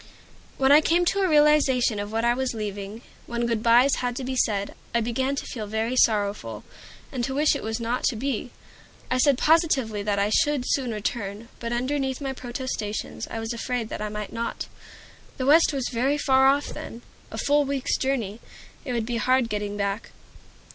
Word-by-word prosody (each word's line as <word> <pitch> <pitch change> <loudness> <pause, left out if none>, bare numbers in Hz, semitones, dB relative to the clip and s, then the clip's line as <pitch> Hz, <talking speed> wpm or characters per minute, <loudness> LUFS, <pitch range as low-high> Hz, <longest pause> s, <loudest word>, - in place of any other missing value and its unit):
When 265 0 +3
I 295 +2 +8
came 345 +3 +2
to 395 - +1
a 380 -2 +2
realization 295 -7 +4
of 205 +1 -4
what 225 +1 0
I 240 - +4
was 260 -1 -2
leaving, 205 +1 -5 0.2
when 235 0 -1
good 230 -2 0
bys 240 +4 +5
had 245 -1 -2
to 265 - -4
be 260 +1 -3
said, 205 -5 0 0.2
I - - +4
began 260 +4 -1
to - - -4
feel 215 -4 -5
very 220 +4 -1
sorrowful, 200 - +1 0.5
and 255 -3 -3
to 265 +2 -2
wish 300 +2 +3
it - - -4
was 220 +1 -3
not 235 +2 -2
to 245 - +1
be. 250 +1 -2 0.6
I 255 - +2
said 280 -1 +4
positively 275 -10 +2
that 200 0 -1
I 200 +1 +1
should 295 0 +2
soon 260 -2 0
return, 210 0 -4
but 235 0 -4
underneath 265 +2 -1
my 270 -2 -3
protestations 245 -4 -4
I 225 - -4
was 225 +1 -3
afraid 235 -1 -3
that - - -5
I 210 - -2
might 210 -1 -6
not. 230 0 -3 0.7
The 255 - -2
West 315 +4 +6
was 270 -4 -2
very 265 +4 +1
far 265 -2 +4
off 280 +2 +2
then, 235 - -8 0.3
a - - -7
full 290 +1 +3
week's 275 -2 -1
journey. 235 -6 -1 0.4
It 255 - -4
would 230 -2 -1
be 240 0 -2
hard 255 +1 +2
getting 205 -1 -3
back. 200 +1 -2
240 Hz, 195 wpm, -25 LUFS, 220-270 Hz, 0.7 s, I